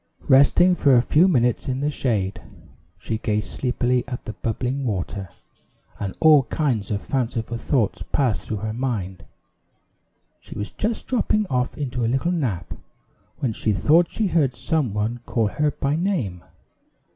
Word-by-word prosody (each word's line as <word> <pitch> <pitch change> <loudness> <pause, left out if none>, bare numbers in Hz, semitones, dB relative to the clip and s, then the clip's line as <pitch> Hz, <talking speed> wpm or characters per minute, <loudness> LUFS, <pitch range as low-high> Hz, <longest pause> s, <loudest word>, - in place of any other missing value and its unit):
Resting 140 +7 +6
for 140 -6 +4
a 120 - +6
few 160 +8 +4
minutes 125 - +1
in 130 0 -1
the 145 +1 0
shade, 105 -9 -1 0.6
she 110 +4 -4
gazed 105 -1 -1
sleepily 125 -1 0
at 125 - -6
the 110 - -5
bubbling 125 +5 -2
water, 100 -4 -3 0.7
and 100 -2 -4
all 155 -3 +7
kinds 125 -10 -1
of 100 -1 -2
fanciful 115 -3 -2
thoughts 115 - 0
passed 130 -6 +1
through 110 - -2
her 110 - -2
mind. 110 -7 -3 1.2
She - - -11
was 105 - -4
just 220 +1 -2
dropping 215 -4 +1
off 125 -1 -1
into 125 -5 -3
a - - +2
little 135 +8 0
nap, 120 - -2 0.7
when 125 -5 0
she 105 0 0
thought 160 - +4
she 220 - -1
heard 155 -9 +1
some 150 -3 -1
one 110 +3 -1
call 110 -3 +1
her 150 +7 0
by 140 0 -1
name. 155 - -2
125 Hz, 155 wpm, -23 LUFS, 110-150 Hz, 1.2 s, all